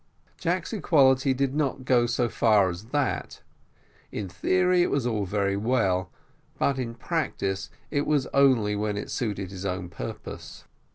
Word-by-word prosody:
Jack's 180 +3 -1
equality 135 -8 +4
did 135 0 0
not 140 -3 -1
go 120 -2 +3
so 120 0 +1
far 105 -5 +3
as 90 +5 -8
that; 140 +3 -2 0.7
in 100 - -4
theory 180 - +2
it 175 - +2
was 140 -4 0
all 110 -4 0
very 100 0 0
well, 100 -5 +1 0.5
but 135 -1 +1
in 115 -2 -4
practice 120 - -2 0.2
it 145 -1 0
was 145 -3 +2
only 130 -7 +4
when 105 0 -1
it 105 - -5
suited 100 -5 -3
his 95 -1 -7
own 90 -2 -3
purpose. 85 - -8
120 Hz, 155 wpm, -26 LUFS, 100-140 Hz, 0.7 s, equality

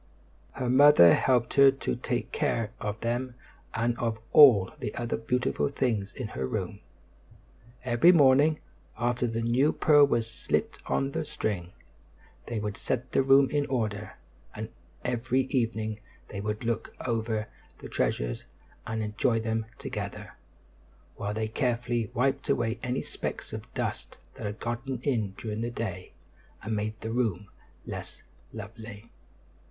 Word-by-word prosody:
Her 130 -2 -3
mother 130 - +8
helped 125 -3 +2
her 140 -1 +8
to 135 - -2
take - - -3
care 115 -2 0
of 105 +1 -4
them 120 +2 -2 0.4
and 115 +1 +1
of 115 -2 -1 0.2
all 115 -11 +8
the 105 - -4
other 120 -1 -2
beautiful 125 +4 0
things 115 -8 -1
in 125 -5 -5
her 65 -8 -3
room. - - -3 1.0
Every 125 +7 +5
morning, 145 -1 +5 0.4
after 120 0 0
the 115 0 -2
new 125 +6 +3
pearl 145 -2 +5
was 120 -4 +1
slipped 115 - -2
on 135 0 0
the 160 +2 -2
string, 95 - -3 0.8
they 120 - -3
would 105 -1 -4
set 125 0 -3
the - - +3
room 135 0 +5
in 145 -1 +1
order; 110 -5 -2 0.4
and 110 +1 -5 0.4
every 125 +2 +1
evening 115 -5 -1 0.3
they 100 - -5
would 105 +2 -3
look 115 -1 -2
over 110 -2 -1 0.3
the - - -9
treasures - - -1 0.4
and 110 0 -2
enjoy 115 +2 +1
them 110 0 -2
together, - - -6 0.8
while 105 +1 -3
they 110 0 -1
carefully 120 -2 -1
wiped 135 +3 0
away 115 -4 +1
any 125 +1 -2
specks - - -5
of - - -7
dust - - -3 0.2
that 110 - -5
had 105 +1 -6
gotten 120 +2 -3
in 110 -9 0
during 110 -1 -4
the 120 - -1
day 110 -6 -5 0.5
and 110 +2 -2
made 105 +1 -3
the 110 - -4
room 105 -5 -1 0.4
less - - -7 0.3
lovely. 110 0 -9
115 Hz, 145 wpm, -28 LUFS, 110-130 Hz, 1.0 s, mother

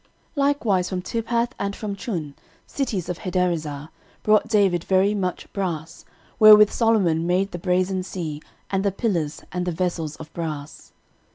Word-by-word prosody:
13:018:008 - - -27
Likewise 205 -11 +1
from 185 -1 -2
Tibhath, 235 +3 -1
and 200 0 -2
from 205 -2 -4
Chun, 170 - -4 0.3
cities 225 - -3
of 180 -2 -4
Hadarezer, 165 -5 -2 0.3
brought 215 0 +4
David 195 -6 +2
very 190 +2 +3
much 185 -3 -3
brass, 165 -5 -4 0.3
wherewith 210 -1 +9
Solomon 190 -8 +2
made 185 +3 +1
the 175 - -5
brasen 185 +1 0
sea, 160 -5 -5 0.3
and 195 0 +1
the 200 - +2
pillars, 180 -8 -2
and 180 0 -2
the - - +1
vessels 165 -3 -2
of 155 - -11
brass. 155 -3 -6
185 Hz, 155 wpm, -23 LUFS, 165-205 Hz, 0.3 s, wherewith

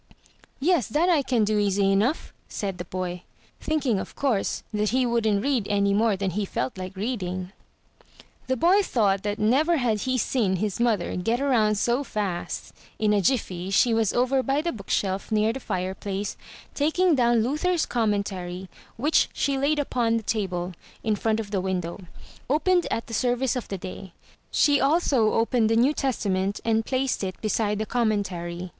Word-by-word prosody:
"Yes, 315 - +2
that 320 +9 +1
I 325 -5 +4
can 250 -4 +1
do 210 0 +1
easy 200 -1 +2
enough," 220 +11 0 0.2
said 195 -3 -4
the 175 - -4
boy, 180 0 -4 0.4
thinking, 280 -9 0
of - - -7
course, 250 -8 0
that 210 0 +1
he 255 +2 +2
wouldn't 220 -4 +1
read 265 -7 0
any 200 -1 +2
more 215 -1 +2
than 195 -1 -1
he 205 +4 -1
felt 130 -9 -3
like 185 0 -7
reading. 185 -4 -3 1.0
The 260 0 0
boy 365 - +4
thought 205 - +1
that 205 0 -2
never 285 +10 +3
had 235 -6 +1
he 255 -1 0
seen 215 -5 +1
his 205 +2 -2
mother 225 -7 +1
get 225 +7 0
around 235 -7 +2
so 240 +6 +1
fast. 200 -8 -4 0.2
In 210 -1 +2
a 205 - +3
jiffy 190 -6 -1
she 225 +4 +3
was 225 -3 +2
over 255 +2 +2
by 275 +3 0
the 340 - 0
book 200 -4 -10
shelf, 195 +2 -1
near 215 +1 +2
the 265 - -5
fire 185 -6 -3
place, 200 +1 -4 0.4
taking 325 +4 +2
down 240 -4 +3
Luther's 320 +7 0
Commentary, 195 -5 -2 0.3
which 295 +7 +2
she 280 -1 0
laid 285 +3 +1
upon 240 -5 +1
the 225 - -4
table, 185 -5 -2 0.3
in 215 -1 +1
front 220 +1 0
of 210 -2 -5
the 195 -3 0
window 180 -1 -3 0.3
— - - -22
opened 350 +5 +2
at 230 - -2
the 230 - -10
service 245 +3 +1
of 250 - -4
the 195 - -4
day. 185 0 -8 0.4
She 290 -2 +3
also 275 -6 +3
opened 225 -1 +2
the 225 - +2
New 250 +6 +4
Testament, 200 -8 -1
and 225 -1 +2
placed 260 -4 0
it 185 -1 -4
beside 215 -1 0
the 215 - -2
Commentary. 185 -7 -2
220 Hz, 180 wpm, -25 LUFS, 195-260 Hz, 1.0 s, I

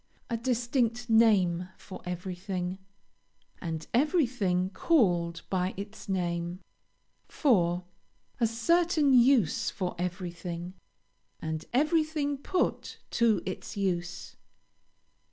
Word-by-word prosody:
A - - +1
distinct 235 0 0
name 190 -6 +4
for 190 - -10
everything, 180 +1 -4 0.8
and 160 -3 -4
everything 235 - +2
called 175 - +2
by 185 -1 0
its 200 +1 -8
name. 175 -1 -1 0.7
4. 180 - +2 0.6
A 230 - +4
certain 305 +5 +3
use 245 - +4
for 185 -2 -3
everything, 175 -1 -4 0.7
and 160 -1 -4
everything 305 0 +1
put 360 +5 -1
to 225 -6 +3
its 190 +2 -6
use. 175 -2 -2
195 Hz, 90 wpm, -29 LUFS, 180-245 Hz, 0.8 s, name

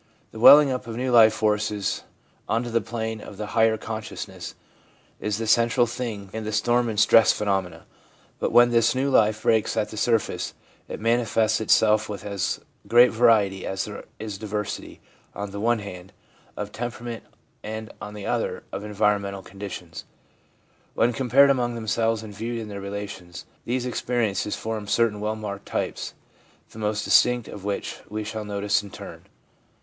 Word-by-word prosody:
The 110 - -9
welling 145 +4 +9
up 125 -2 -4
of 115 - -5
new 130 +1 -1
life 115 -2 +7
forces 105 -1 0 0.5
on 115 +2 +1
to 120 - -5
the 115 0 +2
plane 110 -2 -4
of 100 - -10
the 105 - -4
higher 110 0 +4
consciousness 110 -1 -7 0.6
is 105 -1 -2
the 115 - -3
central 120 +2 +3
thing 110 -5 -5
in 110 0 -4
the 110 - -4
storm 120 +3 +2
and 105 -2 -2
stress 110 -1 +6
phenomena; 95 -5 -2 0.5
but - - -1
when 120 0 +6
this 115 +1 +3
new 135 +2 0
life 110 -2 +3
breaks 110 -1 +2
at 105 - 0
the 110 - -9
surface, 115 0 0 0.3
it - - -6
manifests 115 -1 +1
itself 110 0 +3
with 105 -1 -6
as 100 -2 -2 0.3
great 120 +1 +6
variety 110 -5 +3
as 95 0 -2
there 105 - -8
is 105 -2 -6
diversity, 105 -1 -5 0.3
on 100 -1 -5
the 100 - -6
one 120 +2 +2
hand, 95 -3 -9 0.4
of 105 0 -4
tem 120 +3 -3
perament, 120 -2 -7 0.4
and, 110 0 -6
on 105 0 -7
the 105 - -7
other, - - -2
of 100 - -5
environmental 100 -2 0
conditions. 95 -4 -8 0.9
When 120 +1 +2
compared 135 +3 +5
among 120 -3 0
themselves 115 0 0
and 105 -2 -9
viewed 115 +3 -4
in 110 -2 -6
their 100 -1 -6
relations, 100 -3 -7 0.2
these 125 +1 -1
experiences 115 -4 -1
form 110 -2 -4
certain 110 0 +1
well 105 +1 -2
marked 100 -2 -6
types, - - -3 0.6
the 110 - -11
most 105 0 -1
distinct 125 -2 +4
of 100 - -9
which 100 -1 -3
we 105 +1 -3
shall 110 0 -5
notice 105 0 0
in 100 - -11
turn. - - -10
110 Hz, 170 wpm, -24 LUFS, 105-115 Hz, 0.9 s, welling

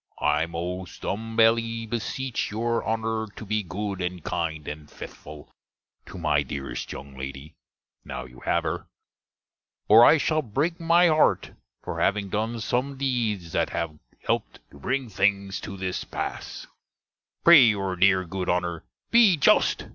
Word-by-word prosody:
I 75 +2 +1
most 90 +2 -6
humbelly 115 +1 +1
beseche 120 +3 -3
your 115 +2 -1
Honner 110 0 -2
to 110 - -8
be 105 +1 0
good 100 +1 -4
and 90 -2 -4
kinde 80 -3 -3
and 75 0 -7
fethful 75 -1 -11 0.6
to - - -9
my 75 -4 +2
deerest 70 -3 -5
younge 70 -1 -9
lady, 70 +4 -7 0.5
now 65 - -6
you 60 -1 -14
have - - 0
her; - - -3 1.0
or 110 +3 +8
I 160 - +7
shall 155 +1 +1
brake 150 - -2
my 170 +1 +4
harte 155 -2 +3 0.3
for - - -5
having 100 -1 +1
done 110 +3 -2
some 130 +5 -1
dedes 115 -10 -1
that - - 0
have 80 -2 -4 0.3
helped - - -1 0.2
to 70 - -15
bringe 130 - -2
things 100 0 +1
to 100 - -7
this 95 -1 -3
passe. - - -6 0.8
Pray 170 -4 +9
youre 100 -4 +1
dere, 95 0 +3
good 90 +1 -4
Honner, 90 -2 -1 0.3
be 225 -7 +6
just! 140 - +3
100 Hz, 145 wpm, -25 LUFS, 85-115 Hz, 1.0 s, Pray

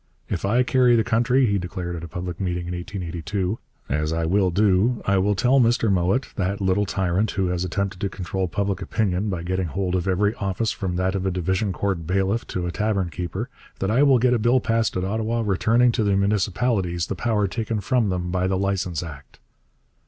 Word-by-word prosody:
'If 90 - -2
I 120 +6 +3
carry 125 -1 +4
the 115 - +3
country,' 120 +3 +2
he 100 -3 +1
declared 90 -1 -5
at 85 - -7
a - - -5
public 90 +1 -5
meeting 90 -2 -2
in 90 - -4
1882, 90 +2 -3 0.3
'as 75 +3 -1
I 80 0 0
will 95 +2 +2
do, 100 +5 +2
I 100 -1 +3
will 100 +2 +2
tell 125 +7 +3
Mr 115 -3 +3
Mowat, 95 +8 +1
that 95 +1 -1
little 95 +1 +1
tyrant 95 +3 0
who 95 -3 -1
has 90 0 -1
attempted 95 +1 -2
to 100 - 0
control 95 0 -3
public 100 +2 -2
opinion 105 -1 -1
by 90 -4 -3
getting 95 0 -1
hold 90 +3 -2
of 90 0 0
every 100 +3 +2
office 100 +3 -1
from 95 -5 -3
that 95 +1 0
of 95 -1 -1
a - - +2
Division 95 +3 0
Court 95 -4 -2
bailiff 95 +5 0
to 90 -1 -3
a 90 - -2
tavern 100 -3 -1
keeper, 90 +7 -4 0.3
that 95 - -1
I 120 +5 +3
will 140 -3 +6
get 125 +1 +3
a 120 - +2
bill 120 +4 +3
passed 115 -4 0
at 90 - -1
Ottawa 110 +3 -1
returning 115 +5 +3
to 110 - 0
the 100 -1 +2
municipalities 100 -3 0
the - - -3
power 105 0 0
taken 110 +2 -2
from 115 +1 +1
them 90 -1 -2
by 90 0 0
the 95 0 0
Licence 95 -4 -1
Act.' 75 -4 -10
95 Hz, 210 wpm, -23 LUFS, 90-110 Hz, 0.3 s, will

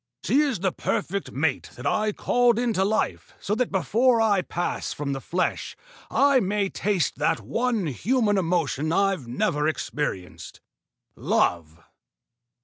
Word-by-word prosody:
She 275 - +2
is 275 - +1
the 190 -1 +1
perfect 195 +3 -3
mate 140 0 -1
that 125 - -10
I 215 0 +1
called 240 +2 +2
into 230 -5 +1
life 215 +3 -1
so 205 - -2
that 245 +2 0
before 230 +6 +2
I 210 -4 +3
pass 175 0 -3
from 140 -1 -3
the 135 - -5
flesh 180 +6 -2 0.3
I 280 -1 +4
may 200 -2 0
taste 195 -5 -1
that - - +1
one 220 - -1
human 205 - +1
emotion 165 -4 0
I've 195 -7 +1
never 150 +5 0
experienced 90 - -4 0.6
love." 85 -1 0
190 Hz, 140 wpm, -25 LUFS, 150-225 Hz, 0.6 s, I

